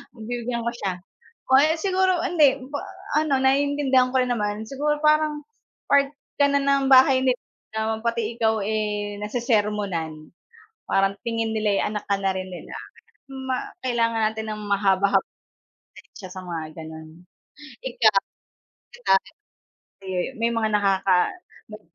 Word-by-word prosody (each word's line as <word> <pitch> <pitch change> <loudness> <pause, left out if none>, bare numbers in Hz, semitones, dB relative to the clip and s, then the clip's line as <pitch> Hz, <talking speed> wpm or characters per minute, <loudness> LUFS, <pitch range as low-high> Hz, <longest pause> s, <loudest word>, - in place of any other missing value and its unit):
Pagbibigyan 235 +1 -4
ko 235 - -1
siya. 195 -5 -2 0.6
O 265 - +5
kaya 310 +3 +4
siguro 375 -1 +2
hindi, 295 -6 +4
pa 285 - -3 0.4
ano 280 -4 +1
naiintindihan 265 -1 +2
ko 260 - +1
rin 250 - -2
naman. 210 0 -3
Siguro 295 +3 -1
parang 305 -1 +3 0.4
part 280 -1 +4 0.3
ka 285 0 +4
na 280 - +3
ng 275 -1 +2
bahay 260 0 +7
nila, 255 -1 +2 0.6
pati 235 -1 -1
ikaw, 220 -1 +2
eh, 210 -1 -2
nasesermonan, 205 -9 -2 0.5
parang 195 0 +2
tingin 225 -1 -2
nila, 215 -1 +1
eh, - - +1
anak 210 0 -4
ka 200 -1 +1
na 195 -1 +1
rin 185 0 -4
nila. 180 - -9 0.6
Ma 265 -1 -4
kailangan 230 -3 +1
natin 220 0 -5
ng 210 - -6
mahaba-hab 195 -1 +2 0.7
pasensya 190 - -12
sa 185 - -8
mga 160 -3 -6
gano'n. 160 0 -9 0.8
Ikaw, 230 -5 +3 0.7
di 485 - -14
ba, 195 - +7 0.9
di, 190 - -9 0.3
may 230 - +3
mga 220 -1 +1
nakaka 195 -2 +3 0.5
may 215 0 -10
225 Hz, 140 wpm, -24 LUFS, 200-265 Hz, 0.9 s, bahay